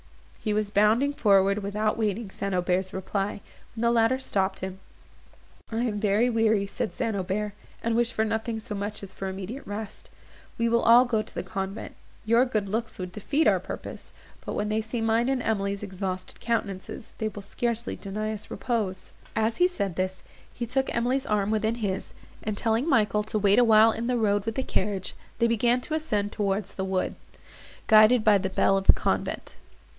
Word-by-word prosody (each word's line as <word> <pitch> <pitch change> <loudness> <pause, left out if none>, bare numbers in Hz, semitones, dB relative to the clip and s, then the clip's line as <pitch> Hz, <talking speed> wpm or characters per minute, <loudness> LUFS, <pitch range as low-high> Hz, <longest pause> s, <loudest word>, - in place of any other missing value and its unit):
He 215 - 0
was 210 -1 0
bounding 220 +8 +3
forward, 200 -4 +3
without 210 +2 0
waiting 210 -1 -1
St. 195 -1 -3
Aubert's 180 +1 0
reply, 195 +2 -3 0.3
when 225 - -5
the 235 - +4
latter 230 +2 +3
stopped 195 -7 -1
him. 190 0 -5 0.9
"I 225 +1 0
am 215 -4 -1
very 210 +3 +3
weary," 220 -3 +2
said 195 -3 -4
St. 225 - -1
Aubert, 200 +2 -2 0.3
"and 230 0 +1
wish 235 0 +2
for 220 - 0
nothing 220 +1 -2
so 215 - -7
much 205 +1 -4
as 190 -1 -9
for 195 - -5
immediate 195 +8 -6
rest. 205 +1 -7 0.5
We 230 - +1
will 235 0 +3
all 240 +2 +7
go 230 -3 +1
to 215 - -11
the - - -2
convent; 195 +1 -5 0.3
your 230 +3 +5
good 215 -6 -1
looks 225 +3 -3
would 180 -1 -5
defeat 280 - 0
our - - +4
purpose; - - -8 0.3
but - - -4
when 210 0 -1
they 215 +1 +1
see 225 +2 -4
mine 225 +2 +2
and 265 -2 0
Emily's 200 -2 -1
exhausted 185 -1 -5
countenances, 215 -3 -3
they 220 - 0
will 205 -1 -7
scarcely 235 +3 -2
deny 215 +2 -4
us 210 - -6
repose." 200 -6 -3 0.2
As 220 +1 +1
he 360 - +5
said 200 - -3
this, 185 0 -2 0.3
he 240 - -4
took 265 +3 0
Emily's 255 +4 0
arm 210 -1 +1
within 220 +1 +1
his, 200 -5 -3 0.3
and, 210 -1 -3
telling 230 +8 +1
Michael 210 -6 +3
to 215 +1 -2
wait 205 +1 +4
awhile 225 -2 +6
in 230 +2 -3
the 250 -1 +1
road 205 -2 +1
with 225 - -1
the 265 - 0
carriage, 195 -4 -2 0.2
they 235 - +3
began 235 +2 +3
to 310 - -5
ascend 210 -10 -1
towards 200 -1 -1
the 190 - -3
woods, 190 -1 -1 0.7
guided 215 +2 +6
by 210 -2 +5
the 190 0 -2
bell 195 +1 +3
of 195 0 -1
the - - +10
convent. - - -2
215 Hz, 190 wpm, -27 LUFS, 195-230 Hz, 0.9 s, the